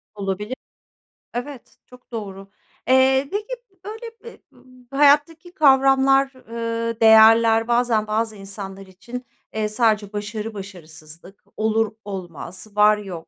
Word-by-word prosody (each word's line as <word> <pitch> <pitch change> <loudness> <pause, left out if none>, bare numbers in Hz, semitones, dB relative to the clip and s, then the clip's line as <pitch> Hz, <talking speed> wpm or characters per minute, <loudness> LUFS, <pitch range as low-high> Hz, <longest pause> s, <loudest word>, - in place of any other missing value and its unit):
Olabilir. 205 +4 -4 0.8
Evet, 250 +1 -7
çok 250 0 -19
doğru. 195 -4 -7 0.4
Eee, 265 +1 +4
peki 420 +1 -3 0.3
b 375 -1 -37
böyle 450 +2 -8
b 470 - -11 0.5
bu 275 - -6
hayattaki 295 +4 +3
kavramlar, 270 -3 +4 0.2
ııı, 230 0 -3
değerler 225 0 +6
bazen 235 -3 +1
bazı 220 +1 -1
insanlar 195 -1 -9
için, 240 +7 -9 0.3
eee, 215 -1 -1
sadece 215 -2 0
başarı-başarısızlık, 195 -5 -8
olur-olmaz, 205 -5 -4
var-yok, 210 -5 +1
225 Hz, 105 wpm, -21 LUFS, 200-260 Hz, 0.8 s, değerler